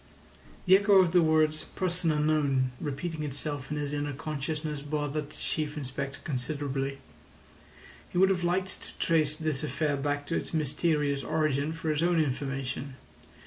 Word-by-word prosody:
The 185 0 +8
echo 200 0 +4
of 180 -3 +5
the 180 0 +5
words 155 -1 +3
"Person 180 -2 0
unknown" 150 -4 +2
repeating 155 +3 -3
itself 145 -1 -3
in 150 - -2
his 145 -1 -2
inner 145 0 -2
consciousness 150 +1 -3
bothered 145 0 -2
the - - -12
Chief 150 0 -2
Inspector 135 0 -4
considerably. 135 -1 -2 1.1
He - - -4
would 190 +1 +6
have 180 -2 0
liked 185 +2 0
to - - -8
trace 155 -3 +2
this 155 -3 -2
affair 150 -1 0
back 145 +1 -1
to 165 - -2
its - - -2
mysterious 150 -2 +1
origin 155 0 +1
for 160 -1 -2
his 150 0 0
own 170 0 +3
information. 135 -2 -2
150 Hz, 155 wpm, -29 LUFS, 140-160 Hz, 1.1 s, The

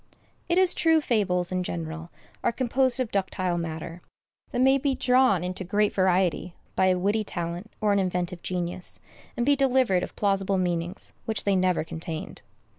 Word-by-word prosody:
It 345 - +2
is 370 -1 +5
true, 325 -1 +3
fables, 190 - +1
in 185 0 0
general, 165 -1 -5 0.3
are - - +2
composed 260 +1 +1
of 250 -4 -1
ductile 185 -2 -1
matter, 165 +1 -6 0.5
that - - -3
may 265 +2 +5
be 275 -1 0
drawn 250 -10 +3
into 185 +1 -4
great 205 +3 +1
variety 185 -2 +1 0.2
by 190 - +3
a 185 -1 +3
witty 205 +4 +1
talent 175 +1 -4
or 210 -2 +2
an 200 - +2
inventive 180 -2 -2
genius, 180 0 -1 0.4
and 240 - 0
be 285 +1 +4
delivered 260 -8 +2
of - - -6
plausible 195 -1 +1
meanings 175 0 -2
which 220 -1 -1
they 200 -1 +2
never 185 -3 +2
contained. 160 0 -6
190 Hz, 170 wpm, -26 LUFS, 175-235 Hz, 0.5 s, is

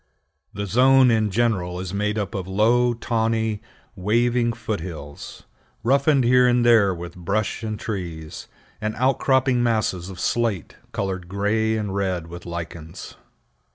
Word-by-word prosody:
The 100 +1 -4
zone 130 +5 +5
in 110 -2 +2
general 95 -5 0
is 95 0 -5
made 105 +1 -1
up 105 +1 -3
of 95 -4 -4
low, 120 +5 +2
tawny, 110 -2 -1 0.3
waving 120 +4 +1
foot 110 -2 -4
hills, 80 -4 -9 0.4
roughened 140 +3 +3
here 125 +1 +5
and 120 -1 +3
there 110 -5 +5
with 85 -1 -7
brush 100 +5 -2
and 110 -1 -4
trees, 85 -7 -6 0.3
and 110 0 -2
outcropping 130 0 +2
masses 110 -6 0
of 95 -2 -9
slate, 115 -7 -1 0.2
colored 95 -3 -3
gray 110 +3 0
and 105 -3 -3
red 95 -4 -1
with 85 +1 -10
lichens. 85 -1 -7
105 Hz, 140 wpm, -23 LUFS, 95-120 Hz, 0.4 s, zone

